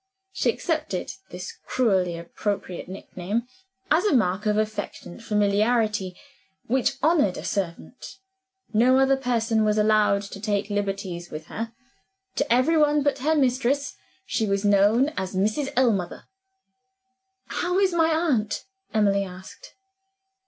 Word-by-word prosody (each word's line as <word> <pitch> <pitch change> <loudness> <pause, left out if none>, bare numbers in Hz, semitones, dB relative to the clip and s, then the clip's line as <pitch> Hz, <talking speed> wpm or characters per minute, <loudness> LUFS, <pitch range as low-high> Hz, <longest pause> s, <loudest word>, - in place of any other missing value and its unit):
She - - 0
accepted 305 - -2 0.2
this 180 +1 -7
cruelly 190 -8 +1
appropriate 180 +1 -4
nick 190 - -10
name 200 +6 -1 0.5
as 320 +4 +4
a 415 -9 +3
mark 200 -2 +1
of 210 0 +2
affectionate 215 -2 -4
familiarity 210 -2 +1 0.5
which 255 +2 +1
honored 295 - +3
a - - -6
servant. 195 - -4 0.6
No 245 +4 +5
other 270 0 +4
person 230 -4 0
was 210 0 +2
allowed 210 -1 +3
to 200 0 -9
take 205 0 -1
liberties 195 -4 -3
with 155 +1 -7
her: 225 +1 -4 0.6
to - - 0
every 255 +7 +4
one 295 -1 +3
but 285 -1 +1
her 310 +4 +1
mistress 270 0 +1 0.3
she 220 - -1
was 200 +1 0
known 205 +7 +4
as 190 0 -3
Mrs. 215 +9 0
Ellmother. 220 -9 +1 1.3
"How 360 +1 -1
is 385 -2 +3
my 325 -1 +3
aunt?" 290 -10 0 0.3
Emily 200 -2 +3
asked. 185 0 -11
215 Hz, 130 wpm, -25 LUFS, 200-265 Hz, 1.3 s, No